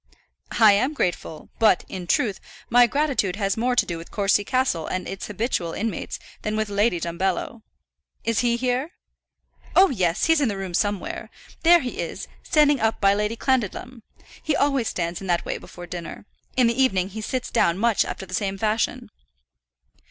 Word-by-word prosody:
"I 220 Hz, -2 st, +8 dB
am 255 Hz, +9 st, +1 dB
grateful; 175 Hz, -, -3 dB
but, 215 Hz, -6 st, +4 dB
in 180 Hz, -2 st, -7 dB
truth, 205 Hz, +2 st, +1 dB, 0.3 s
my 245 Hz, +1 st, +7 dB
gratitude 275 Hz, -9 st, 0 dB
has 200 Hz, -1 st, 0 dB
more 245 Hz, +2 st, 0 dB
to -, -, +3 dB
do 170 Hz, -2 st, -4 dB
with 165 Hz, -, -11 dB
Courcy 200 Hz, 0 st, +2 dB
Castle 255 Hz, -9 st, 0 dB
and 185 Hz, 0 st, -3 dB
its 195 Hz, -, -6 dB
habitual 210 Hz, -5 st, -2 dB
inmates, 220 Hz, -5 st, -3 dB, 0.2 s
than 215 Hz, 0 st, -2 dB
with 215 Hz, -1 st, -1 dB
Lady 205 Hz, -2 st, +1 dB
Dumbello. 185 Hz, +6 st, -2 dB, 0.6 s
Is 230 Hz, -2 st, 0 dB
he 235 Hz, -1 st, +2 dB
here?" 255 Hz, +6 st, -1 dB, 0.8 s
"Oh, 385 Hz, -3 st, +6 dB
yes! 180 Hz, -6 st, +1 dB
he's 325 Hz, -2 st, +3 dB
in 275 Hz, -, +3 dB
the 200 Hz, -, -3 dB
room 190 Hz, -2 st, -5 dB
somewhere. 205 Hz, +1 st, -2 dB, 0.3 s
There 340 Hz, +1 st, +6 dB
he 250 Hz, -, -5 dB
is, -, -, -4 dB
standing 295 Hz, -2 st, +3 dB
up 225 Hz, 0 st, 0 dB
by 200 Hz, -1 st, +4 dB
Lady 210 Hz, +2 st, -1 dB
Clandidlem. 250 Hz, 0 st, -1 dB, 0.4 s
He 305 Hz, -, 0 dB
always 275 Hz, -5 st, +1 dB
stands 170 Hz, 0 st, -3 dB
in 195 Hz, -, -7 dB
that 175 Hz, -1 st, 0 dB
way -, -, -3 dB
before 175 Hz, -, -11 dB
dinner. 175 Hz, +1 st, -7 dB, 0.3 s
In 250 Hz, -, +5 dB
the 235 Hz, +3 st, +2 dB
evening 195 Hz, -8 st, +2 dB
he 215 Hz, +2 st, -7 dB
sits 255 Hz, +3 st, -3 dB
down 170 Hz, +1 st, +2 dB
much 230 Hz, +1 st, +2 dB
after 190 Hz, -, -6 dB
the 185 Hz, -, -11 dB
same 195 Hz, +1 st, -1 dB
fashion." 215 Hz, +2 st, -1 dB
215 Hz, 180 wpm, -24 LUFS, 185-250 Hz, 0.8 s, I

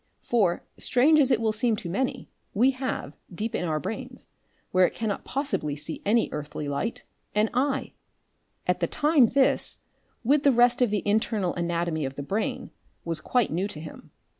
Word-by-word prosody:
For, 195 Hz, -8 st, +1 dB
strange 295 Hz, +5 st, +4 dB
as 270 Hz, -3 st, +4 dB
it 250 Hz, -4 st, +3 dB
will 225 Hz, -1 st, +1 dB
seem 225 Hz, +1 st, +1 dB
to 200 Hz, -, -7 dB
many, 205 Hz, +10 st, -2 dB, 0.3 s
we 250 Hz, +6 st, +5 dB
have, 255 Hz, -, -4 dB, 0.2 s
deep 215 Hz, +6 st, -4 dB
in -, -, -1 dB
our 155 Hz, -2 st, 0 dB
brains 195 Hz, +7 st, -6 dB, 0.4 s
where 185 Hz, -1 st, +5 dB
it -, -, -9 dB
cannot 215 Hz, -3 st, -2 dB
possibly 265 Hz, -, -2 dB
see 150 Hz, +2 st, -6 dB
any 225 Hz, +3 st, +3 dB
earthly 150 Hz, 0 st, -5 dB
light 145 Hz, +11 st, -3 dB, 0.3 s
an 215 Hz, +1 st, +2 dB
eye! 270 Hz, +2 st, 0 dB, 0.7 s
At -, -, +1 dB
the -, -, +1 dB
time 295 Hz, -4 st, +4 dB
this, 265 Hz, +3 st, +2 dB, 0.4 s
with 280 Hz, +5 st, +3 dB
the 280 Hz, -, +5 dB
rest 245 Hz, 0 st, +4 dB
of 245 Hz, -, +4 dB
the 205 Hz, -1 st, -1 dB
internal 210 Hz, -3 st, +1 dB
anatomy 170 Hz, -2 st, -1 dB
of 135 Hz, 0 st, -5 dB
the 140 Hz, -, -5 dB
brain, 200 Hz, +9 st, -2 dB, 0.3 s
was 165 Hz, -2 st, -2 dB
quite 245 Hz, -3 st, +1 dB
new 180 Hz, +5 st, 0 dB
to 185 Hz, -7 st, -7 dB
him. 155 Hz, -1 st, -10 dB
215 Hz, 180 wpm, -26 LUFS, 170-250 Hz, 0.7 s, we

